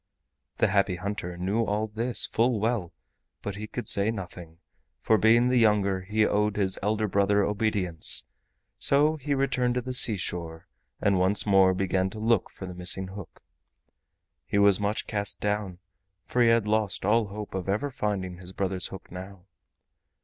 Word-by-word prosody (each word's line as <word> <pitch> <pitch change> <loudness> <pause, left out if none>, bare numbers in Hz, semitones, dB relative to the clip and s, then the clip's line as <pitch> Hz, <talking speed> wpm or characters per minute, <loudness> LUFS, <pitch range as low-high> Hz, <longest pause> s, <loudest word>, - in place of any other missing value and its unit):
The - - +3
Happy 100 -1 +2
Hunter 90 -1 -5
knew 100 +6 0
all 105 0 -1
this 115 +3 -1
full 115 0 +1
well, 110 -5 -1 0.5
but 100 - -4
he 105 +2 -6
could 120 - -6
say 100 +2 +2
nothing, 90 -6 -7 0.4
for 110 - +3
being 115 +3 +4
the 125 -1 +3
younger 100 -4 +2
he 105 +3 +1
owed 105 0 +1
his 95 -2 0
elder 105 +1 0
brother 100 +1 +2
obedience; 100 -6 0 0.6
so 150 +3 +3
he 145 0 -2
returned 125 -2 +1
to 125 - 0
the 130 +1 -5
seashore 90 -8 -1 0.3
and 100 -2 +2
once 95 +3 +2
more 95 -2 +4
began 95 0 0
to 105 - -9
look 110 -2 +1
for 95 - -9
the 90 - -7
missing 90 +1 -2
hook. 95 -2 -11 1.0
He - - -1
was 100 -1 +5
much 105 +1 -1
cast 100 -2 -2
down, 105 -3 -2 0.5
for 125 - 0
he 120 - +5
had 115 -2 +3
lost 105 -3 0
all 110 +1 +3
hope 105 +1 -7
of 95 0 -4
ever 135 +9 -1
finding 100 -7 -3
his 90 0 -9
brother's 95 -2 -2
hook 95 - -11
now. 95 0 -9
100 Hz, 170 wpm, -27 LUFS, 95-110 Hz, 1.0 s, was